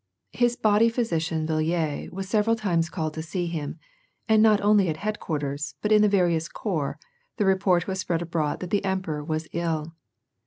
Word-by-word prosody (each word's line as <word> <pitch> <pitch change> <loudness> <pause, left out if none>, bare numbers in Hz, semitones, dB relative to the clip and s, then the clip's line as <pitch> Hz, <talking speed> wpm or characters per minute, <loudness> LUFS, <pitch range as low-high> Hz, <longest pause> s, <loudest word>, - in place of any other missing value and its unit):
His 240 0 +1
body 215 0 +4
physician 165 -9 -1
Villiers 155 -1 -1
was 195 +1 -5
several 215 +2 +2
times 175 -7 0
called 155 -3 -3
to 160 - -4
see 175 +2 -3
him, 160 -4 -4 0.5
and 220 -1 +5
not 215 -2 +5
only 205 -3 +4
at 155 - -2
headquarters, 150 -8 -3
but 210 - -2
in 210 0 +6
the 210 - +5
various 175 -4 +2
corps, 160 -10 -3 0.4
the 210 - +1
report 190 -2 +3
was 190 -1 -3
spread 175 -2 -1
abroad 160 -3 -2
that 180 - -6
the 205 - +1
emperor 185 -6 -2
was 155 +1 -3
ill. 165 -2 -2
175 Hz, 180 wpm, -25 LUFS, 160-205 Hz, 0.5 s, in